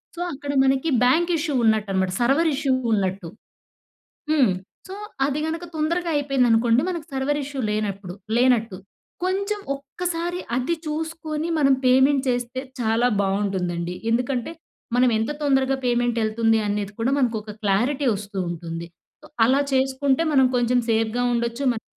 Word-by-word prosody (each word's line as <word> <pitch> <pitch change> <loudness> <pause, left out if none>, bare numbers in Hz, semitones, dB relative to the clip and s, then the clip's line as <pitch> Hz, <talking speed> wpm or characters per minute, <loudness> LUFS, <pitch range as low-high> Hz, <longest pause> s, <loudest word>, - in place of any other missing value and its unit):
So, 345 - -6
అక్కడ 285 +1 -5
మనకి 270 +4 +2
bank 335 +8 +3
issue 300 -1 -2
ఉన్నట్టనమాట, 200 -4 +1
server 280 +7 +3
issue 270 -1 +1 0.2
ఉన్నట్టు. 190 -3 -1 1.0
హ్మ్. 270 -10 +4 0.4
సో, 380 - -6 0.3
అది 285 +1 -2
గనక 325 +2 -3
తొందరగా 335 +3 -1
అయిపోయిందనుకోండి, 245 -4 +3
మనకు 340 -4 -5
సర్వర్ 275 +2 0
ఇష్యూ 275 0 -5
లేనప్పుడు 200 -3 -3 0.2
లేనట్టు. 235 -5 +2 0.5
కొంచెం 400 +3 -1 0.2
ఒక్కసారి 345 +5 -4 0.2
అది 260 +7 0
చూసుకొని 315 0 -3
మనం 275 -2 +4
పేమెంట్ 265 +2 +4
చేస్తే 245 +1 -2 0.2
చాలా 230 +1 +2 0.2
బావుంటుందండి. 185 -3 -1 0.2
ఎందుకంటే 250 +3 -1 0.4
మనం 250 0 +4
ఎంత 220 +4 -1
తొందరగా 270 -2 +2
పేమెంట్ 240 -1 +1
ఎళ్తుంది 225 +1 +2
అనేది 205 0 -2
కూడా 235 +3 +1
మనకొక 225 -5 -1
క్లారిటీ 245 +9 +1
వస్తూ 200 0 -6
ఉంటుంది. 170 0 -6 0.4
సో, - - -13 0.2
అలా 270 +4 +3
చేసుకుంటే 265 +2 +1
మనం 265 -2 +6
కొంచెం 245 0 +2
సేఫ్‌గా 225 +2 +1
ఉండొచ్చు, 235 +3 -2
మనకి 225 - -8
250 Hz, 135 wpm, -23 LUFS, 220-290 Hz, 1.0 s, మనం